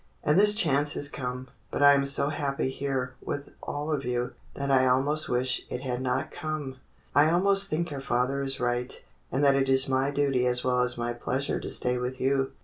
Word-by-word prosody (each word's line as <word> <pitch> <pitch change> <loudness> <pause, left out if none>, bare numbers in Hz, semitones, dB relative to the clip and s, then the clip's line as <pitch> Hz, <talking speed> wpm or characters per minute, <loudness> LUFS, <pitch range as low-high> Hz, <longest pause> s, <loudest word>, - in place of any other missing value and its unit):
And 150 - +3
this 210 +2 +5
chance 150 -6 +2
has 145 - -2
come. 125 -2 -5 0.2
But - - -1
I 145 0 +9
am 140 -1 +2
so 140 +1 +1
happy 140 -3 -2
here 130 -2 -3
with 140 0 -5
all 145 +2 -4
of 145 -3 -1
you 125 -1 -2 0.2
that 140 0 -2
I 130 -1 +4
almost 145 +5 +2
wish 125 0 0
it 125 - -4
had 125 -2 -3
not 130 +3 -1
come. 155 -5 -5 0.4
I 145 +3 +5
almost 195 +3 +3
think 170 +1 -2
your 140 -2 -5
father 135 +1 0
is 135 0 -2
right, 125 0 -2 0.3
and 135 +3 0
that 140 -1 +6
it 135 -1 +1
is 130 0 +3
my 135 +1 +1
duty 140 -3 +1
as 125 0 +1
well 125 -1 +2
as 125 0 +1
my 120 0 -2
pleasure 130 +3 -2
to - - -6
stay 125 0 0
with 125 +1 -4
you." 135 0 +1
135 Hz, 215 wpm, -27 LUFS, 125-145 Hz, 0.4 s, I